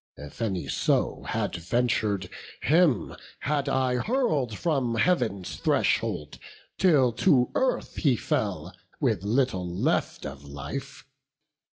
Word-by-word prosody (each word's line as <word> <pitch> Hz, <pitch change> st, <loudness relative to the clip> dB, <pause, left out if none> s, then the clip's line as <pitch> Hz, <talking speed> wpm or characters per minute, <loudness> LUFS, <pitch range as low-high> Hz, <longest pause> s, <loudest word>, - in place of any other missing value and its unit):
If 75 Hz, +9 st, -10 dB
any 95 Hz, -9 st, -1 dB
so -, -, 0 dB
had -, -, -1 dB
ventur'd, 105 Hz, 0 st, 0 dB, 0.4 s
him 155 Hz, -, +3 dB, 0.3 s
had 145 Hz, -1 st, 0 dB
I 130 Hz, -2 st, +1 dB
Hurl'd 150 Hz, -, 0 dB
from 135 Hz, -8 st, 0 dB
Heav'n's 110 Hz, -, 0 dB
threshold -, -, 0 dB, 0.4 s
till 145 Hz, -10 st, +4 dB
to 125 Hz, +2 st, +3 dB
earth 260 Hz, -1 st, 0 dB
he 135 Hz, -5 st, +3 dB
fell, -, -, -2 dB, 0.3 s
With -, -, +1 dB
little 100 Hz, -4 st, 0 dB
left 85 Hz, -, -1 dB
of 70 Hz, 0 st, -7 dB
life. 70 Hz, -1 st, -7 dB
120 Hz, 110 wpm, -27 LUFS, 95-140 Hz, 0.4 s, till